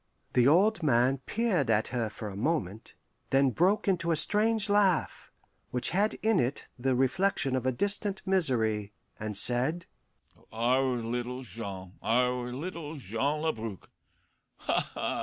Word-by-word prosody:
The 125 0 +4
old 190 +7 +3
man 130 -2 +2
peered 205 - 0
at 110 -1 +1
her 120 -3 -2
for 105 0 -8
a 100 - -7
moment, 110 - -3 0.3
then 135 -1 +3
broke 195 - +1
into 170 -3 0
a 165 - +3
strange 215 +6 +2
laugh, 200 -4 +1 0.4
which 125 -1 0
had 205 +5 +1
in 220 -3 +3
it 125 +3 -2
the 130 +1 0
reflection 135 +1 +1
of 130 0 -2
a - - +3
distant 200 - -1
misery, 115 - +2 0.3
and 105 -2 0
said, 130 +10 +4 0.7
"Our 125 +3 +1
little 125 +2 -4
Jean, 95 -4 -8
our 125 +1 0
little 160 +3 -6
Jean 140 +5 -2
Labrouk! 115 - -4 0.7
Ha! - - -1
ha! - - -2
130 Hz, 140 wpm, -29 LUFS, 115-175 Hz, 0.7 s, The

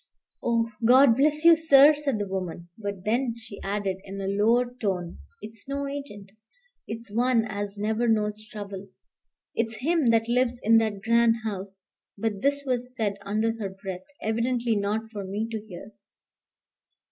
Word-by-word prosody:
"Oh, 230 -1 0
God 250 +1 +6
bless 300 +4 +2
you, 335 0 +9
sir," 300 -2 +7
said 290 -5 -1
the 205 -1 -3
woman. 180 -3 -5
But 200 -3 -6
then 235 +2 0
she 220 -3 -11
added, 195 -1 -2
in 195 0 -8
a 195 - -3
lower 230 +5 +2
tone, 180 -5 -2 0.2
"It's 220 +3 -9
no 280 0 -2
agent. 275 -9 -7 0.6
It's 225 -1 -7
one 240 0 +2
as 205 -1 -5
never 220 +3 0
knows 215 -1 0
trouble. 200 -2 -7 0.7
It's 225 0 -2
him 325 -4 +2
that 225 -1 +3
lives 245 0 +1
in 225 +1 +6
that 215 -3 0
grand 230 0 +4
house." 195 -2 -6 0.3
But 205 -1 -2
this 285 +1 +2
was 250 -1 -2
said 205 -4 -1
under 215 +3 +1
her 200 -3 -3
breath, 190 -1 -7 0.2
evidently 235 +1 0
not 210 +2 -2
for 205 -3 -5
me 205 +4 -3
to 220 -2 -3
hear. 195 +2 -10
220 Hz, 160 wpm, -26 LUFS, 200-245 Hz, 0.7 s, you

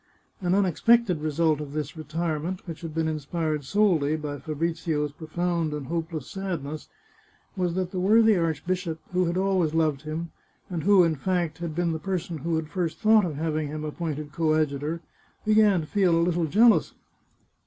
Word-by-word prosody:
An 180 0 +1
unexpected 200 -1 +3
result 155 0 +1
of 145 -1 -7
this 150 0 -4
retirement, 165 +3 -3
which 165 -4 -7
had 165 -2 -5
been 160 -1 +1
inspired 155 0 -2
solely 160 -3 +2
by 150 -2 -5
Fabrizio's 160 -1 -2
pro 155 +2 -11
found 170 -1 -1
and 150 -2 -4
hopeless 165 -1 -3
sadness, 165 -6 -5 0.7
was 180 -3 -1
that 185 -1 -2
the 185 - -3
worthy 220 +3 +5
archbishop, 165 0 -1
who 180 0 +2
had 170 +1 -1
always 185 -5 +1
loved 155 -4 +1
him, 160 +2 -5 0.4
and 170 -3 -3
who, 200 -2 +6
in 165 -1 +2
fact, 170 +1 -1
had 170 -3 -4
been 175 0 +1
the 160 - -3
person 175 -3 -3
who 165 +4 -1
had 160 -1 -2
first 170 -2 -2
thought 215 -2 +5
of 160 -4 -3
having 155 0 -1
him 155 +1 -5
appointed 150 -1 -4
coad 155 -1 +2
jutor, 150 +4 -4 0.4
began 210 -4 +4
to - - -6
feel 185 -1 +2
a 170 - +3
little 175 -1 +1
jealous. 225 +8 +4
165 Hz, 175 wpm, -26 LUFS, 155-180 Hz, 0.7 s, who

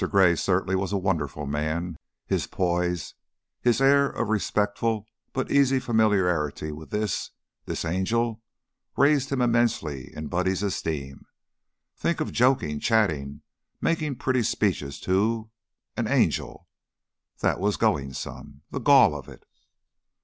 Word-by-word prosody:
Gray 95 -4 +5
certainly 95 +2 +1
was 95 0 -1
a 100 - +1
wonderful 75 -7 -2
man. 80 +3 -2 0.3
His - - -1
poise, 90 -2 -1 0.5
his 120 -1 +3
air 140 +1 +5
of 120 - -3
respectful 105 +1 0 0.3
but 130 - -3
easy 135 -1 +4
familiarity 95 - +1
with 75 +1 -10
this 105 0 -2 0.4
this - - -3
angel 110 +6 0 0.6
raised 140 -1 +3
him 130 -2 +1
immensely 115 - 0
in 75 - -5
Buddy's 95 +4 0
esteem. 75 -8 -3 0.7
Think - - -1
of - - -2
joking, 115 - +2
chatting, 80 -12 0 0.4
making 155 -4 0
pretty 130 0 0
speeches 90 -10 -1
to 110 +4 0 0.4
an - - -1
an - - -3
angel! - - 0 0.7
That - - +1
was 100 +2 0
going 70 -2 +1
some. 70 +2 -8
The - - -3
gall - - +6
of 75 -3 -8
it! - - -14
95 Hz, 130 wpm, -26 LUFS, 80-115 Hz, 0.7 s, gall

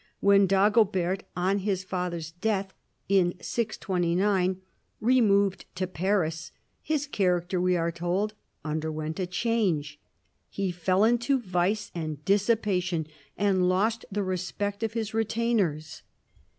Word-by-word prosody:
When 200 0 +5
Dago 205 +4 +5
bert, 185 +1 -1
on 190 +3 +1
his 190 -1 -1
father's 180 -3 -3
death 195 +2 -2 0.3
(in 185 -2 +3
629), 185 -3 0 0.4
removed 200 -5 +3
to 185 +1 -1
Paris, 175 -3 -1 0.3
his 305 -2 -1
character 180 -7 0
we 180 0 +2
are 170 0 0
told, 175 +5 -1 0.3
underwent 155 +1 -3
a 185 - -1
change. 180 -8 0 0.5
He 195 -2 -2
f<>ll 185 +4 +2
into 240 +3 +2
vice 195 0 -1
and 155 -3 -5
dissipation, 195 -5 +1 0.3
and 190 -3 +2
lost 215 +5 +1
the 205 +1 -1
respect 190 +2 -3
of 225 -1 -2
liis 220 -2 -3
retainers. 220 -9 0
190 Hz, 120 wpm, -27 LUFS, 175-210 Hz, 0.5 s, When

